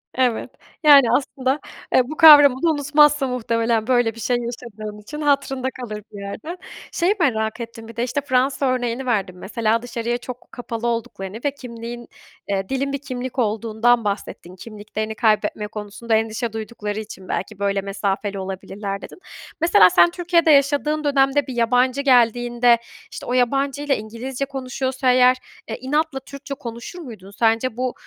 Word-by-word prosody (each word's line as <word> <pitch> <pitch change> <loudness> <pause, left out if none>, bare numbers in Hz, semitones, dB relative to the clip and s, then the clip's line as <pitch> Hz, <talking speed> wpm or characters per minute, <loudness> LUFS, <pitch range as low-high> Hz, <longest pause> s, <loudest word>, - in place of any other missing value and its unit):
Evet. 250 -3 0 0.3
Yani, 280 -6 +7
aslında, 265 +1 0 0.3
eee, - - +6
bu 310 - -6
kavramını 295 0 +8
unutmazsın 295 -1 +3
muhtemelen, 230 -2 0
böyle 245 -3 +2
bir - - -11
şey 245 +2 0
yaşadığım 230 -3 -7
için. 300 +9 -8
Hatırında 275 -3 0
kalır 215 -3 -6
bir 205 - -10
yerde. 220 - -6 0.3
Şeyi 360 +4 +1
merak 220 -8 0
ettim 230 -1 -8
bir 230 - -11
de. 235 - -1
İşte 255 +4 -1
Fransa 270 0 +1
örneğini 255 0 -1
verdin 200 -7 -1
mesela. 225 +3 -1
Dışarıya 240 0 -3
çok 245 0 -10
kapalı 240 -1 -5
olduklarını 220 -4 -4
ve 285 - +2
kimliğin, 240 -3 -8 0.4
eee, 195 -1 -2
dilin 275 +1 -1
bir - - 0
kimlik 255 -1 -5
olduğundan 225 +1 +1
bahsettin. 200 -3 -5
Kimliklerini 215 +2 -6
kaybetme 215 -1 +1
konusunda 210 +2 -3
endişe 220 +1 -1
duydukları 215 -1 -5
için 205 -3 -9
belki 195 +3 -4
böyle 200 -1 0
mesafeli 200 0 -3
olabilirler 195 +1 -5
dedin. - - -11 0.4
Mesela 320 - +6
sen 175 -1 +5
Türkiye'de 335 - +2
yaşadığın 290 +2 +2
dönemde 275 -1 +2
bir 260 - -5
yabancı 250 +3 +2
geldiğinde, 240 -2 +4 0.3
işte, - - -8
o 245 - -3
yabancıyla 275 +3 +1
İngilizce 240 +5 -5
konuşuyorsa 260 -1 -1
eğer, 250 0 +5 0.3
eee, 225 - -4
inatla 295 +2 -1
Türkçe 280 +1 -9
konuşur 235 +6 -8
muydun? 220 - -10
Sence 225 +2 +1
bu, 255 0 -1
240 Hz, 150 wpm, -21 LUFS, 220-270 Hz, 0.4 s, kavramını